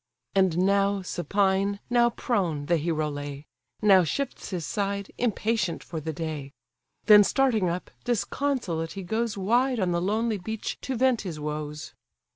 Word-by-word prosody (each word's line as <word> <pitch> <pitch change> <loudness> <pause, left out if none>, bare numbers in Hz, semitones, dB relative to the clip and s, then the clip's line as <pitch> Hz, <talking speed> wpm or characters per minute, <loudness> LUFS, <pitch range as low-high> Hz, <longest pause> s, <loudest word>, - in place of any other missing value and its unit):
And 190 -4 +3
now 200 0 +2
supine, 195 +2 0
now 240 -1 +4
prone, 180 - -1
the 170 +2 +2
hero 155 -1 -1
lay, 145 0 -6 0.4
Now 195 -3 +7
shifts 275 - -3
his 180 -5 -3
side, 200 -1 -2
impatient 220 -5 0
for 160 -2 -6
the 160 +1 -3
day: 150 -3 -5 0.5
Then 210 -1 +9
starting 225 -6 +2
up, 175 +2 -4
disconsolate 240 - -1
he 195 - -6
goes 220 +4 -1
Wide 240 +6 +2
on 185 -3 +1
the 170 0 0
lonely 215 +3 0
beach 220 +4 -4
to 265 - -3
vent 255 -1 +2
his 170 -6 -6
woes. 150 0 -5
195 Hz, 150 wpm, -26 LUFS, 165-225 Hz, 0.5 s, Then